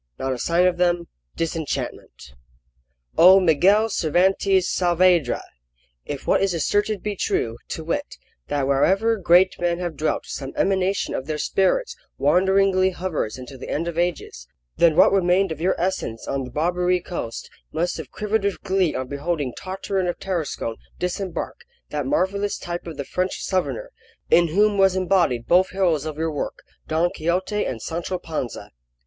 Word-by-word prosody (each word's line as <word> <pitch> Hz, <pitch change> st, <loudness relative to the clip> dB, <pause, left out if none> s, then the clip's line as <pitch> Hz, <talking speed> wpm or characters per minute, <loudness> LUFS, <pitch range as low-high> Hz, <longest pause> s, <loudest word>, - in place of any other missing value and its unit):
Not 135 Hz, 0 st, -2 dB
a 125 Hz, -, -6 dB
sign 170 Hz, +5 st, +2 dB
of 180 Hz, -1 st, +2 dB
them 175 Hz, -1 st, +1 dB, 0.3 s
Disenchantment 160 Hz, -, -4 dB, 0.9 s
O 185 Hz, +3 st, +9 dB
MIGUEL 190 Hz, +6 st, +4 dB
CERVANTES 190 Hz, +2 st, +2 dB
SAAVEDRA, 175 Hz, -5 st, +2 dB, 0.6 s
if 145 Hz, -2 st, -5 dB
what -, -, +3 dB
is 195 Hz, -3 st, +1 dB
asserted 205 Hz, +5 st, 0 dB
be 210 Hz, -1 st, -2 dB
true, 115 Hz, -9 st, -1 dB
to 160 Hz, -, -5 dB
wit, 165 Hz, -, -3 dB, 0.3 s
that 145 Hz, -2 st, -1 dB
wherever 195 Hz, +12 st, +3 dB
great 185 Hz, 0 st, +4 dB
men 175 Hz, -1 st, 0 dB
have 175 Hz, -3 st, -4 dB
dwelt 155 Hz, +3 st, -1 dB
some 135 Hz, -1 st, -6 dB
emanation 190 Hz, 0 st, 0 dB
of 130 Hz, -, -4 dB
their 155 Hz, -1 st, -2 dB
spirits 195 Hz, -, +1 dB, 0.2 s
wanderingly 190 Hz, +4 st, +3 dB
hovers 175 Hz, -11 st, -3 dB
until 130 Hz, +1 st, -10 dB
the -, -, -8 dB
end 165 Hz, +3 st, -2 dB
of 170 Hz, -, -4 dB
ages, 170 Hz, -, -3 dB, 0.3 s
then 165 Hz, -2 st, +4 dB
what -, -, +6 dB
remained 190 Hz, -1 st, +2 dB
of 160 Hz, 0 st, -5 dB
your 185 Hz, +2 st, +1 dB
essence 170 Hz, -11 st, -2 dB
on 135 Hz, -1 st, -2 dB
the -, -, -8 dB
Barbary 180 Hz, +6 st, +1 dB
coast 170 Hz, -10 st, -6 dB, 0.2 s
must 175 Hz, +3 st, -1 dB
have 155 Hz, -5 st, -7 dB
quivered 210 Hz, 0 st, -1 dB
with 200 Hz, -1 st, -1 dB
glee 190 Hz, -4 st, +1 dB
on 130 Hz, -, -3 dB
beholding 140 Hz, -1 st, -2 dB
Tartarin 190 Hz, 0 st, -3 dB
of 175 Hz, -, -2 dB
Tarascon 160 Hz, -11 st, -3 dB, 0.2 s
disembark, 180 Hz, 0 st, -3 dB, 0.3 s
that 145 Hz, -3 st, -2 dB
marvellous 200 Hz, +6 st, 0 dB
type 175 Hz, 0 st, -6 dB
of 160 Hz, -3 st, -7 dB
the 140 Hz, -, -4 dB
French 185 Hz, +5 st, -2 dB
Southerner, -, -, -2 dB, 0.4 s
in 170 Hz, 0 st, +6 dB
whom 205 Hz, +5 st, +2 dB
was 190 Hz, -1 st, +4 dB
embodied 175 Hz, -10 st, +1 dB
both 185 Hz, +2 st, +4 dB
heroes 175 Hz, -6 st, +1 dB
of 155 Hz, -1 st, -5 dB
your 160 Hz, 0 st, -1 dB
work, 145 Hz, -, -5 dB, 0.2 s
Don 165 Hz, +2 st, +1 dB
Quixote 185 Hz, +5 st, -1 dB
and 120 Hz, -, -4 dB
Sancho 170 Hz, +3 st, -3 dB
Panza. 155 Hz, -9 st, -5 dB
175 Hz, 160 wpm, -23 LUFS, 155-190 Hz, 0.9 s, O